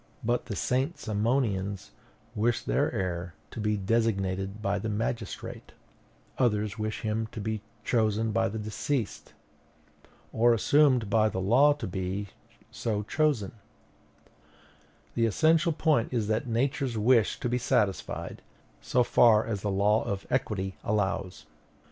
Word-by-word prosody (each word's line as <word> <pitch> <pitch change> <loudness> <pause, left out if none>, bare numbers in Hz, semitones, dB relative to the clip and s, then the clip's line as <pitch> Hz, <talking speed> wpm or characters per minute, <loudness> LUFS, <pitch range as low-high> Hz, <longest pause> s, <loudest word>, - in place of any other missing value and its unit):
But 120 +2 0
the 105 - -4
St. 130 - 0
Simonians 105 -3 -1 0.4
wish 115 +1 0
the - - -2 0.2
heir 85 -2 -3 0.2
to - - -7
be 105 0 0
designated 100 -2 0
by 100 -1 -1
the 110 - -3
magistrate; 110 0 -4 0.7
others 105 -4 +1
wish 110 0 -3
him 110 0 -1
to - - -7
be 110 0 -3 0.2
chosen 110 -1 +1
by 115 +1 +1
the 110 - -5
deceased, 110 +3 -3 1.0
or 115 +1 +4
assumed 130 -1 +3
by 110 -1 +4
the 95 - -3
law 125 +10 +5
to 145 -5 -6
be 95 +1 -3 0.4
so 105 -2 -2
chosen: 140 -5 0 1.6
the 115 -1 +2
essential 160 - +3
point 150 -6 +1
is 115 -4 -1
that 110 +3 0
Nature's 130 +1 -1
wish 115 0 +3
be 120 +1 -1
satisfied, 105 -5 -1 0.4
so 125 - +2
far 115 -2 +5
as 105 -4 -3
the 105 - -2
law 100 +3 +2
of 100 -1 -4
equality 100 -7 -1
allows. 100 -3 -1
110 Hz, 130 wpm, -28 LUFS, 100-120 Hz, 1.6 s, law